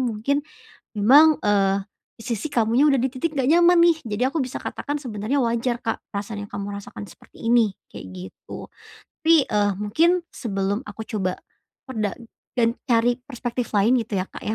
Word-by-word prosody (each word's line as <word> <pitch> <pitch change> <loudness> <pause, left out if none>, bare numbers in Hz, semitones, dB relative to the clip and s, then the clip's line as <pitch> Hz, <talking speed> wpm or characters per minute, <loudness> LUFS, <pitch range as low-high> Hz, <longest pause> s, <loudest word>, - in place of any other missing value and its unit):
mungkin 255 +4 -1 0.5
memang, 290 +9 +6
eee, 195 -1 +2 0.3
di 225 - -13
sisi 235 +2 -3
kamunya 235 +5 +3
udah 275 -4 +3
di 265 - +1
titik 290 +5 -3
nggak 265 0 +1
nyaman 345 +1 +6
nih. 320 - -3 0.2
Jadi 245 - 0
aku 320 - -2
bisa 255 -1 -3
katakan 290 - -4
sebenernya 235 +3 -2
wajar 235 +1 -1
Kak, 225 - -2
perasaan 205 0 -4
yang - - -28
kamu 205 0 -5
rasakan 205 - -9
seperti - - -17
ini, 230 -5 +4 0.2
kayak 95 - -9
gitu. 95 +1 -10 0.5
Tapi, 325 -3 +6
eee, 205 -1 +2
mungkin 320 - +2
sebelum 200 +1 -2
aku 220 - -7
coba 185 -4 -2 0.5
perda 215 -5 -1 0.5
dan 230 0 +3
cari 240 -2 +3
perspektif 245 -2 -4
lain 210 +5 +4
gitu 205 -3 -3
ya, 185 - -3
Kak, - - -11
ya, 215 - -1
230 Hz, 175 wpm, -23 LUFS, 205-270 Hz, 0.5 s, memang